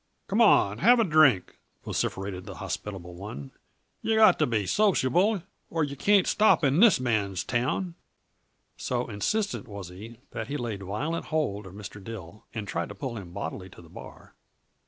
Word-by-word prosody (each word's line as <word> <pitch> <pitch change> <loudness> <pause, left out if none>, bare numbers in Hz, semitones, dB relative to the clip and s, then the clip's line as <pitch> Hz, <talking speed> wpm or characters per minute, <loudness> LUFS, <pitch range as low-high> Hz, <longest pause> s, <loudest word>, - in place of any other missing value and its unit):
"Come - - +1
on 100 - +6
'n' 105 - -7
have 240 - +6
a - - +5
drink!" 155 - +3 0.3
vociferated 95 -1 -3
the 100 - -7
hospitable 90 -3 -6
one. 85 -7 -8 0.5
"Yuh 225 - +1
got 220 0 +6
to - - +3
be 110 -4 0
sociable, 190 - +2 0.3
or 165 -1 0
yuh 140 -1 -3
can't 200 +5 +4
stop 215 -5 +4
in 140 +3 +3
this 215 - +6
man's 105 -7 0
town." 145 +9 -1 0.8
So 125 -1 -2
insistent 205 - -2
was 100 -4 -8
he 110 +6 -11
that 115 -2 -5
he 145 - -3
laid 115 -6 -4
violent 110 - -3
hold 140 -11 -2
of 95 - -12
Mr. 105 0 -9
Dill 105 -1 -9
and 105 -3 -5
tried 85 -2 -3
to 100 - -8
pull 120 +4 -5
him 95 -5 -8
bodily 95 0 -6
to 90 - -14
the 85 - -16
bar. - - -12
115 Hz, 175 wpm, -27 LUFS, 100-155 Hz, 0.8 s, on